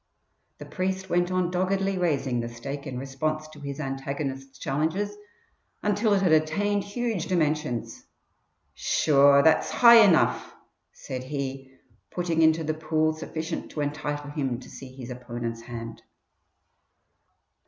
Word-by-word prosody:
The - - -9
priest 190 0 -3
went 175 0 +2
on 185 -1 0
doggedly 195 +2 0
raising 140 -8 0
the 115 0 -3
stake 140 +5 -7
in 130 -2 -5
response 155 +4 -3
to 155 -1 -13
his 140 0 -6
antagonist's 135 -1 -4
challenges 160 +11 -1 0.7
until 210 +1 +2
it 195 - +1
had 180 - +3
attained 200 +7 +2
huge 220 -4 -3
dimensions. 150 -8 -1 0.7
"Sure 140 -1 +4
that's 160 -1 +4
high 235 -2 +8
enough," 180 -6 +2 0.4
said 130 0 -7
he, 135 -1 -5 0.3
putting 170 -2 -1
into 160 0 +4
the 155 0 -1
pool 155 0 0
sufficient 160 +1 -5
to 150 - -4
entitle 145 0 -3
him 135 -5 -2
to - - -13
see 135 -2 -10
his 130 -1 -9
opponent's 120 -2 -5
hand. 115 -1 -8
155 Hz, 130 wpm, -26 LUFS, 135-175 Hz, 0.7 s, high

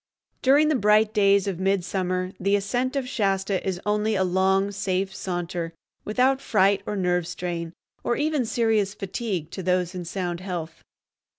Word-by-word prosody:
During 285 +4 +5
the 310 - +2
bright 215 -1 +4
days 200 -2 +4
of 190 -3 -3
midsummer 185 -1 0
the 200 +2 +2
ascent 245 +7 -1
of 270 -2 -1
Shasta 195 -4 0
is 185 -2 -2
only 210 +1 +1
a 190 - +2
long, 190 +2 +2
safe 195 -1 -1
saunter, 175 -2 -4 0.3
without 260 +5 +2
fright 200 -1 +3
or 210 - -2
nerve 180 -3 0
strain, 175 -2 -4 0.3
or 240 - +1
even 300 -2 +1
serious 220 -3 +1
fatigue, 195 -5 -4
to 190 - -5
those 180 0 0
in 180 -1 -5
sound 175 -1 -3
health. 175 -4 -5
195 Hz, 160 wpm, -25 LUFS, 180-210 Hz, 0.3 s, During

